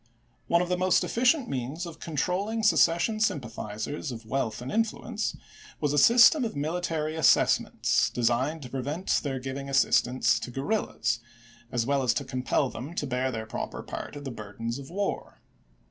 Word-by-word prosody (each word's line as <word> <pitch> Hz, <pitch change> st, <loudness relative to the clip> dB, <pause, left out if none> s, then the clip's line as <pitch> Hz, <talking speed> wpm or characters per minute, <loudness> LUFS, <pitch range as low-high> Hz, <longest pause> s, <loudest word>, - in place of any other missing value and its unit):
One 170 Hz, +1 st, +3 dB
of 180 Hz, -, -5 dB
the 180 Hz, 0 st, 0 dB
most 185 Hz, 0 st, +3 dB
effi 230 Hz, -, -3 dB
cient 255 Hz, 0 st, +4 dB
means 135 Hz, -, -3 dB
of 165 Hz, -1 st, -9 dB
controlling 185 Hz, +8 st, -1 dB
secession 210 Hz, +1 st, +3 dB
sympathizers 120 Hz, -, -3 dB
of 115 Hz, -2 st, -8 dB
wealth 110 Hz, -2 st, -2 dB
and 125 Hz, +2 st, -6 dB
influence, 225 Hz, 0 st, -1 dB, 0.4 s
was 145 Hz, -1 st, 0 dB
a 145 Hz, -, +4 dB
system 245 Hz, -, +7 dB
of 225 Hz, -, -3 dB
military 155 Hz, +1 st, -2 dB
assessments 160 Hz, -3 st, +3 dB
designed 125 Hz, +6 st, 0 dB
to 125 Hz, -, -8 dB
prevent 145 Hz, +7 st, -1 dB
their 135 Hz, -3 st, -3 dB
giving 135 Hz, +2 st, -5 dB
as 135 Hz, -, +2 dB
sistance 120 Hz, -2 st, +2 dB
to -, -, -5 dB
guerrillas, 125 Hz, -, -1 dB, 0.5 s
as 120 Hz, -2 st, 0 dB
well 140 Hz, +1 st, +1 dB
as 120 Hz, -2 st, +2 dB
to 140 Hz, -, -2 dB
compel 130 Hz, +1 st, 0 dB
them 135 Hz, +7 st, -7 dB
to 145 Hz, -, -1 dB
bear 130 Hz, 0 st, -1 dB
their 110 Hz, -2 st, -4 dB
proper 110 Hz, -, -5 dB
part -, -, -7 dB
of 145 Hz, -, -7 dB
the 135 Hz, -, -5 dB
burdens 115 Hz, +2 st, -5 dB
of 135 Hz, -, -10 dB
war. 200 Hz, +3 st, -3 dB
140 Hz, 175 wpm, -27 LUFS, 125-175 Hz, 0.5 s, system